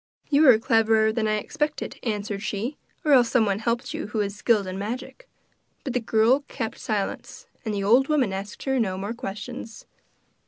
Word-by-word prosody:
'You 290 0 +6
are 235 - +8
cleverer 220 -1 +3
than 220 -1 0
I 215 - +2
expected,' 295 +8 -3
answered 210 -3 -3
she; 215 +7 -3 0.3
'or 300 - +3
else 245 -3 +6
someone 210 -5 +2
helped 235 +1 -2
you - - -4
who 210 0 -1
is 200 0 -3
skilled 210 0 +2
in 185 +1 -5
magic.' 250 - -6 0.5
But 265 - -3
the 250 - +1
girl 230 +4 +3
kept 225 - -5
silence, 210 -3 -3 0.2
and 220 - -2
the 200 - -2
old 245 +7 +4
woman 270 -10 +1
asked 195 +2 -6
her 265 -1 0
no 190 -5 0
more 200 +4 -4
questions. 225 +2 -7
220 Hz, 185 wpm, -25 LUFS, 205-250 Hz, 0.5 s, are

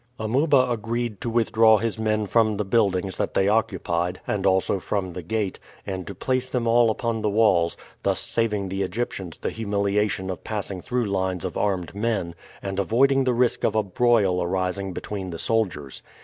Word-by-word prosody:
Amuba 130 +4 +3
agreed 115 -1 -2
to 120 - -2
withdraw 110 -1 +4
his 115 +1 -2
men 110 -1 +1
from 110 0 +2
the 105 - -1
buildings 95 -3 +1
that - - -2
they 95 - +3
occupied, 95 -5 0
and 100 -2 0
also 95 +1 +2
from 95 -2 -2
the 90 - -5
gate, 100 +3 -2 0.3
and 95 -2 -5
to 100 - -6
place 130 +5 -1
them 125 -2 -1
all 115 0 +4
upon 115 0 -1
the 105 - +1
walls, 100 -6 +3 0.2
thus - - +1
saving 105 -4 -1
the 95 +1 -2
Egyptians 95 -3 -3
the - - -3
humiliation 100 -2 0
of 90 - -7
passing 100 -4 -4
through 125 +3 -1
lines 95 -2 -1
of 90 - -4
armed 95 -4 -1
men, 100 -5 -1 0.3
and 95 0 -3
avoiding 135 +6 +3
the 125 - +2
risk 125 0 +1
of 110 - +1
a 110 - +3
broil 100 -2 +2
arising 95 +2 -1
between 95 +1 -5
the 85 - -5
soldiers. 85 -11 -1
105 Hz, 180 wpm, -24 LUFS, 95-115 Hz, 0.3 s, withdraw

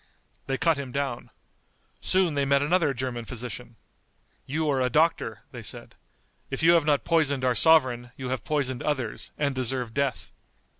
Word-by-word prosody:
They 135 0 -1
cut 165 +2 +2
him 140 -3 -6
down. 135 -3 -3 0.7
Soon 185 -4 +2
they 140 -1 +1
met 140 0 +3
another 160 -1 +2
German 125 -2 -4
physician. 120 0 -7 0.7
"You 155 +3 -1
are 135 -3 +1
a 125 - +2
doctor," 160 +4 +1
they - - -8
said. - - -7 0.6
"If 135 +3 -4
you 165 - +7
have 165 -3 +4
not 145 -2 +2
poisoned 145 -6 +1
our 125 - +3
sovereign 130 -5 +4
you 130 -2 -5
have 130 -4 -3
poisoned 135 -4 -1
others, 130 -7 -3
and 140 -2 0
deserve 125 -2 -1
death." 140 0 -2
135 Hz, 165 wpm, -26 LUFS, 125-150 Hz, 0.7 s, you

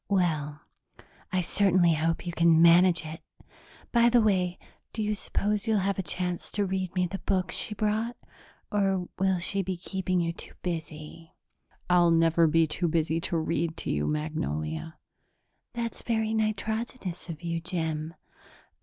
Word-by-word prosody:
"Well, 155 -6 0 0.7
I 185 0 +1
certainly 180 -1 +3
hope 165 +2 -1
you 175 - -3
can 165 -1 +4
manage 170 0 +6
it! 160 +1 -7 0.7
By 235 0 +5
the 240 0 +5
way, 185 -5 +2 0.4
do 220 - -2
you 210 0 0
suppose 210 +1 -1
you'll 220 -1 +3
have 195 0 0
a - - +2
chance 180 -1 -3
to 205 0 +1
read 190 -1 -3
me 180 -1 +2
the 190 +2 -5
books 185 -2 -1
she 215 - -2
brought, 215 +3 -1 0.5
or 195 -3 +1
will 190 -1 +2
she 195 +3 0
be 190 -1 -3
keeping 185 0 -2
you 170 -1 0
too - - -11
busy?" 160 -1 -6 0.5
"I'll 175 -1 +5
never 165 0 +4
be 165 +1 +4
too 165 +3 -1
busy 165 0 0
to 170 - -1
read 160 0 -1
to - - -3
you, 75 0 0
Magnolia." 80 - -3 0.8
"That's 235 -1 -4
very 220 -2 0
nitrogenous 220 -3 -2
of 160 0 -7
you, 170 -1 -2
Jim. 160 -2 -3
180 Hz, 155 wpm, -28 LUFS, 165-195 Hz, 0.8 s, manage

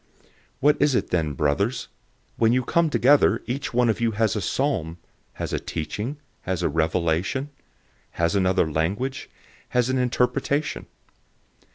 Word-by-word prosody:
014:026 - - -30 0.3
What 145 +2 +3
is 145 -2 +3
it - - 0
then, 80 -4 0
brothers? 95 - 0 0.5
When 115 0 +3
you 130 0 +2
come 170 +6 +2
together, 145 0 +4
each 135 +4 -3
one 125 0 +2
of 115 +1 0
you 115 -1 +1
has 110 -1 +1
a 105 - -1
psalm, 90 - -1 0.4
has - - -5
a - - 0
teaching, 105 - -4 0.2
has 90 -1 -2
a - - +2
revelation, 85 - 0 0.6
has 85 0 0
another 95 -3 +2
language, 100 - -2 0.4
has 125 0 +1
an 130 - +1
interpretation. 125 +4 0
115 Hz, 150 wpm, -24 LUFS, 85-130 Hz, 0.6 s, together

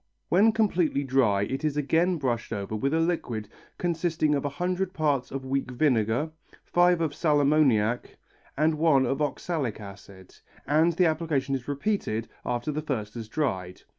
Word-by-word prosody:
When 205 +6 +5
completely 180 -10 +1
dry 125 -7 +2
it 135 +8 -3
is 150 -1 0
again 165 +5 +2
brushed 120 -5 -2
over 100 +1 -3
with 135 +6 0
a 160 - +2
liquid 125 -11 -2 0.3
consisting 165 -3 0
of 140 - 0
one 140 - -3
hundred 180 +3 -2
parts 145 -5 0
of 135 -1 -5
weak 135 0 -1
vinegar, 125 +1 +1 0.3
five 175 -1 +3
of 155 -3 0
sal 150 -2 +2
ammoniac 130 -6 +2 0.4
and 155 +1 +2
one 150 -5 +4
of 135 +4 -1
oxalic 145 - -2
acid, 100 -2 -12 0.3
and 155 +5 +3
the 180 +2 +3
application 155 -4 0
is 130 -2 -3
repeated 140 - -2 0.2
after 120 +5 -2
the 150 +1 -3
first 110 -8 -3
has 115 -2 -7
dried. 95 -11 -3
145 Hz, 165 wpm, -27 LUFS, 120-160 Hz, 0.4 s, When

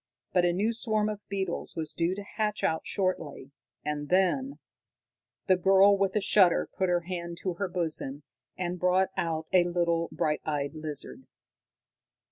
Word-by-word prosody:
But 180 -1 +4
a 175 - +3
new 205 +6 0
swarm 215 -2 +1
of 210 -1 -4
beetles 190 -3 -3
was 160 -2 -4
due 170 +2 0
to 205 - -6
hatch 210 +1 -2
out 160 0 0
shortly, 180 -8 -2 0.3
and 145 -1 -3
then 195 +10 +2 0.9
The 185 -2 +4
girl, 195 +2 +6
with 195 0 0
a 210 - +2
shudder, 190 -3 +4
put 190 -1 0
her 175 -1 +2
hand 170 -1 -5
to 185 - -1
her 195 +3 -2
bosom, 160 -5 -2 0.3
and 180 0 -3
brought 180 +1 +3
out 160 -1 -1
a 180 -2 +6
little 170 -1 0
bright 150 -1 -1
eyed 145 -2 -2
lizard. 155 - -7
180 Hz, 160 wpm, -28 LUFS, 165-195 Hz, 0.9 s, girl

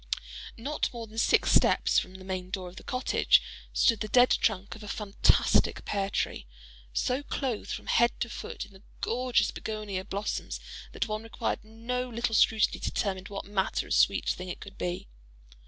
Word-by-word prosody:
Not 280 +6 -1
more 235 -2 -6
than 220 +1 -6
six - - +4
steps - - +4
from 185 - -7
the 190 - -10
main 185 -1 -4
door 185 -2 -4
of 180 - -16
the - - -9
cottage 255 -1 +3 0.3
stood 230 -4 +3
the 215 - -2
dead 245 +3 +5
trunk 200 -2 +1
of 220 - -11
a 210 - -8
fantastic 205 0 +2
pear 195 -1 -1
tree, - - -2 0.4
so 250 - 0
clothed 265 -5 -3
from - - -4
head 235 0 +3
to - - +1
foot 235 - -6
in 200 - -19
the 190 - -16 0.2
gorgeous 250 +1 +1
bignonia 210 -3 -4
blossoms 200 +2 -3 0.3
that - - -1
one 215 0 -2
required 225 -2 -3
no 235 +3 -3
little 235 -1 -1
scrutiny 220 0 +4
to - - -1
determine 190 -2 -2
what 200 -1 -6
manner 195 -1 0
of - - +1
sweet - - +3
thing 185 0 -2
it - - -5
could 200 -1 -10
be. 180 0 -3
215 Hz, 185 wpm, -29 LUFS, 195-235 Hz, 0.4 s, dead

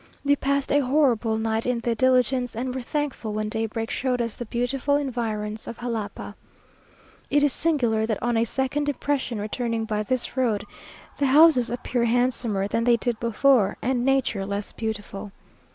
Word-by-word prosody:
We 285 0 +4
passed 280 0 -1
a 290 - +4
horrible 250 -5 +2
night 220 +1 -1
in 250 -1 +1
the 235 0 0
diligence, 250 0 +2
and 250 +2 -3
were 260 - -3
thankful 270 -5 -3
when 215 0 -2
daybreak 225 +1 -3
showed 250 -1 -1
us 230 -2 -2
the 240 - -6
beautiful 250 +5 0
environs 225 -6 -3
of 230 - -6
Jalapa. 225 -4 -5 1.0
It 290 0 +3
is 290 -3 +3
singular 240 -9 +1
that 220 -3 0
on 240 0 0
a 225 - +3
second 265 +4 -1
impression, 280 -5 -2
returning 225 +1 -2
by 210 -1 -1
this 250 +3 -2
road, 225 -6 0 0.5
the 280 - +2
houses 285 -3 +6
appear 245 0 -1
handsomer 235 -4 +1
than 230 +3 0
they 240 0 +4
did 235 -1 -2
before, 235 -2 +3
and 245 0 0
nature 265 -6 +1
less 200 +1 -4
beautiful. 205 -2 -5
240 Hz, 170 wpm, -25 LUFS, 220-265 Hz, 1.0 s, houses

